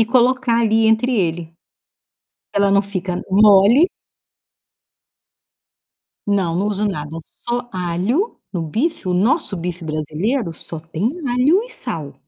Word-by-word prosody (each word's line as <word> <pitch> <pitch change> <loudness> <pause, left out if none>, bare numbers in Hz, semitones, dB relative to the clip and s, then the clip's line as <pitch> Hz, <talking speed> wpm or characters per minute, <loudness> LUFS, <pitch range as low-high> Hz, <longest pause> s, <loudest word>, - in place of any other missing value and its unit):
e - - +5
colocar 250 0 +2
ali 225 0 +3
entre 225 +3 +2
ele. 165 -3 -1 1.0
Ela 200 -1 +3
não 200 0 +4
fica 185 -2 -4
mole. 210 - +6 2.4
Não, 190 -5 0
não 200 +3 0
uso 210 0 -1
nada, 150 -7 -4 0.4
só 240 0 -2
alho. 185 - -1
No 175 -3 -2
bife 230 - -2
o 180 - +1
nosso 215 - +1
bife 175 0 -5
brasileiro 165 - -2
só 165 0 -5
tem 165 +3 -5 0.2
alho 275 - +3
e - - -12
sal 165 - -3
200 Hz, 125 wpm, -19 LUFS, 175-240 Hz, 2.4 s, mole